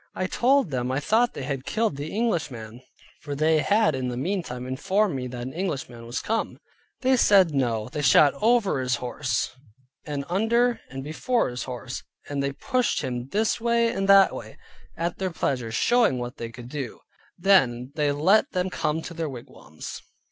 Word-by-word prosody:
I 185 Hz, -, -1 dB
told 250 Hz, -, +2 dB
them 125 Hz, -1 st, -1 dB
I 130 Hz, -, 0 dB
thought 225 Hz, +10 st, +2 dB
they -, -, -5 dB
had 135 Hz, -1 st, -3 dB
killed 220 Hz, 0 st, 0 dB
the 145 Hz, +3 st, -5 dB
Englishman 135 Hz, -, -2 dB, 0.4 s
(for 145 Hz, -1 st, -5 dB
they 155 Hz, +2 st, +3 dB
had 210 Hz, +1 st, +3 dB
in 130 Hz, -1 st, -2 dB
the 125 Hz, -1 st, -3 dB
meantime 140 Hz, -5 st, -3 dB
informed 185 Hz, +9 st, 0 dB
me 125 Hz, -1 st, -3 dB
that 120 Hz, -1 st, -6 dB
an 130 Hz, -, -6 dB
Englishman 135 Hz, -9 st, -4 dB
was 120 Hz, 0 st, -3 dB
come). 225 Hz, +1 st, -1 dB, 0.4 s
They 260 Hz, 0 st, +4 dB
said, 195 Hz, -9 st, +5 dB
no. 115 Hz, -5 st, 0 dB
They 150 Hz, +4 st, -4 dB
shot 145 Hz, +2 st, +6 dB
over 220 Hz, -, +3 dB
his 125 Hz, -1 st, +1 dB
horse 125 Hz, -2 st, -2 dB, 0.5 s
and 145 Hz, -2 st, -4 dB
under 230 Hz, +5 st, +2 dB
and 135 Hz, 0 st, -6 dB
before 230 Hz, -, 0 dB
his 125 Hz, 0 st, -5 dB
horse, 125 Hz, -3 st, -6 dB, 0.3 s
and 140 Hz, -1 st, -2 dB
they 140 Hz, 0 st, -1 dB
pushed 250 Hz, -, 0 dB
him 125 Hz, -2 st, -3 dB
this 220 Hz, +4 st, 0 dB
way 235 Hz, 0 st, +2 dB
and 195 Hz, -3 st, -2 dB
that 195 Hz, -1 st, +7 dB
way, -, -, -8 dB, 0.4 s
at 170 Hz, +1 st, -2 dB
their 190 Hz, -1 st, -1 dB
pleasure, 125 Hz, -8 st, -2 dB
showing 230 Hz, -, +3 dB
what 120 Hz, 0 st, -5 dB
they 115 Hz, -, -5 dB
could 120 Hz, +1 st, -10 dB
do. 135 Hz, -4 st, -6 dB, 0.4 s
Then 130 Hz, -10 st, +3 dB
they 150 Hz, -1 st, +1 dB
let 185 Hz, +10 st, +3 dB
them 180 Hz, 0 st, -1 dB
come 160 Hz, -1 st, -1 dB
to 170 Hz, -, -7 dB
their 165 Hz, -2 st, -3 dB
wigwams. 115 Hz, -, -9 dB
150 Hz, 185 wpm, -25 LUFS, 125-200 Hz, 0.5 s, that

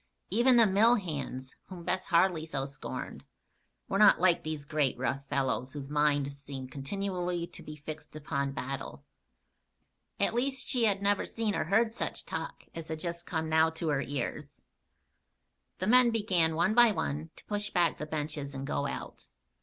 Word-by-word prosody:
Even 240 Hz, +5 st, +5 dB
the 230 Hz, -1 st, +7 dB
mill 215 Hz, +4 st, +5 dB
hands, 140 Hz, -, -4 dB
whom 180 Hz, -2 st, -9 dB
Bess 185 Hz, +2 st, -1 dB
Harley 170 Hz, -1 st, +3 dB
so 135 Hz, -4 st, -2 dB
scorned, 140 Hz, +1 st, -7 dB, 0.6 s
were 195 Hz, -, 0 dB
not 210 Hz, -1 st, +7 dB
like 175 Hz, -1 st, +4 dB
these 155 Hz, -3 st, -5 dB
great, 145 Hz, -3 st, 0 dB
rough 135 Hz, +2 st, -2 dB
fellows 130 Hz, -1 st, -1 dB
whose 140 Hz, -1 st, -7 dB
minds 145 Hz, -2 st, +2 dB
seemed 135 Hz, -2 st, -7 dB
continually 180 Hz, +4 st, -3 dB
to -, -, -11 dB
be 155 Hz, -, -8 dB
fixed 155 Hz, +1 st, -9 dB
upon 140 Hz, -2 st, -2 dB
battle. 135 Hz, 0 st, -5 dB, 1.1 s
At -, -, +2 dB
least, 265 Hz, +2 st, 0 dB
she 245 Hz, -3 st, +2 dB
had 200 Hz, -2 st, +2 dB
never 200 Hz, 0 st, +2 dB
seen 225 Hz, -2 st, -1 dB
or -, -, -1 dB
heard 220 Hz, +6 st, +2 dB
such -, -, -4 dB
talk -, -, -5 dB
as 165 Hz, -1 st, -7 dB
had 160 Hz, -1 st, -4 dB
just 170 Hz, 0 st, -5 dB
now 160 Hz, -1 st, +3 dB
come 160 Hz, -, -5 dB
to 165 Hz, -1 st, -2 dB
her 145 Hz, -2 st, +1 dB
ears. 140 Hz, -3 st, -4 dB, 1.2 s
The 185 Hz, -, -2 dB
men 245 Hz, +3 st, +6 dB
began, 185 Hz, -8 st, +2 dB
one 205 Hz, +6 st, +2 dB
by 240 Hz, 0 st, +7 dB
one, 160 Hz, -6 st, -2 dB
to -, -, -16 dB
push 205 Hz, 0 st, -2 dB
back 175 Hz, -3 st, +1 dB
the 150 Hz, -, -4 dB
benches 150 Hz, -2 st, -4 dB
and 135 Hz, 0 st, -4 dB
go 140 Hz, 0 st, -1 dB
out. -, -, -7 dB
160 Hz, 175 wpm, -30 LUFS, 145-200 Hz, 1.2 s, the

